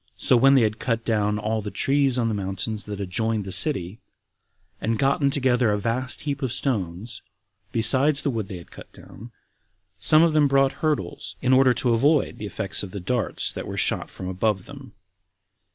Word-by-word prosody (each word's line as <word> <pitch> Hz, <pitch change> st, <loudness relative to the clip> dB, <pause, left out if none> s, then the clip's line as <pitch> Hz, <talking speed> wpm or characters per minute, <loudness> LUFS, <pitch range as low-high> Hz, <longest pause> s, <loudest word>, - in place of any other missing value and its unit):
So -, -, +3 dB
when 135 Hz, +3 st, +5 dB
they 130 Hz, -, +5 dB
had 110 Hz, 0 st, -1 dB
cut 115 Hz, -2 st, -2 dB
down 105 Hz, -2 st, 0 dB
all 110 Hz, +1 st, -2 dB
the 105 Hz, -, -5 dB
trees 135 Hz, +2 st, +1 dB
on 120 Hz, -2 st, +1 dB
the 110 Hz, -, -1 dB
mountains 100 Hz, +2 st, -4 dB
that 105 Hz, -1 st, -6 dB
adjoined 110 Hz, +3 st, -1 dB
to 95 Hz, -, -8 dB
the -, -, -6 dB
city, 95 Hz, -, +1 dB, 0.8 s
and 115 Hz, -, 0 dB
had 110 Hz, -, -3 dB
gotten 140 Hz, +1 st, +2 dB
together 130 Hz, -4 st, +2 dB
a 105 Hz, -, +1 dB
vast 120 Hz, +4 st, -3 dB
heap 145 Hz, -1 st, -4 dB
of 130 Hz, -4 st, -2 dB
stones, 110 Hz, -, -3 dB, 0.5 s
besides 140 Hz, +5 st, +2 dB
the 140 Hz, -, 0 dB
wood 110 Hz, -5 st, -3 dB
they 95 Hz, -, -7 dB
had 85 Hz, -, -14 dB
cut -, -, -13 dB
down, 115 Hz, +3 st, -13 dB, 0.7 s
some 155 Hz, +1 st, +5 dB
of 165 Hz, -2 st, +3 dB
them 150 Hz, -2 st, +4 dB
brought 135 Hz, 0 st, +3 dB
hurdles, 155 Hz, -2 st, -2 dB
in 130 Hz, 0 st, +2 dB
order 130 Hz, -1 st, +5 dB
to 120 Hz, -2 st, +1 dB
avoid 140 Hz, +5 st, +2 dB
the 105 Hz, -, -5 dB
effects 100 Hz, 0 st, -3 dB
of 100 Hz, -, -6 dB
the 100 Hz, -, -7 dB
darts 115 Hz, +5 st, -2 dB
that -, -, -7 dB
were -, -, -6 dB
shot -, -, 0 dB
from 95 Hz, -, -8 dB
above 95 Hz, +1 st, -1 dB
them. -, -, -12 dB
115 Hz, 200 wpm, -24 LUFS, 105-135 Hz, 0.8 s, when